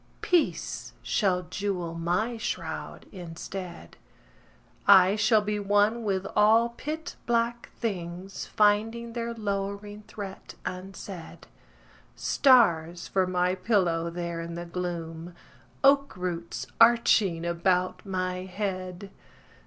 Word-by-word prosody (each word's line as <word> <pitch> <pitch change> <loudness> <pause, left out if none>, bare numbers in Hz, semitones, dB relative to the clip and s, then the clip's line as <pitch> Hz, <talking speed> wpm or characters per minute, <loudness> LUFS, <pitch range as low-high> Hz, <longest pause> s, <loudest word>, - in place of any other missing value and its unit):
Peace 350 -3 0
shall 185 -4 +1
jewel 180 -1 -3
my 180 +8 -1
shroud 225 - -5
instead. 175 - -8 0.9
I 190 0 +7
shall 215 0 +3
be 210 0 -1
one 205 +3 +2
with 195 -3 -1
all 220 +3 +5
pit 310 +7 -6
black 235 0 0
things 185 -3 -4
Finding 225 +3 +2
their 235 0 -3
lowering 205 -1 -4
threat 195 -2 -8
unsaid: 185 -1 -7 0.7
Stars 175 - +3
for 190 -1 +2
my 180 0 +1
pillow 185 -4 +1
there 170 -1 -4
in 170 0 -6
the 175 0 -5
gloom,— 170 -1 -5 0.5
Oak 275 -4 +4
roots 175 -2 -4 0.2
arching 220 -7 +5
about 180 +2 0
my 185 -2 -2
head! 190 -1 -4
190 Hz, 105 wpm, -27 LUFS, 175-215 Hz, 0.9 s, I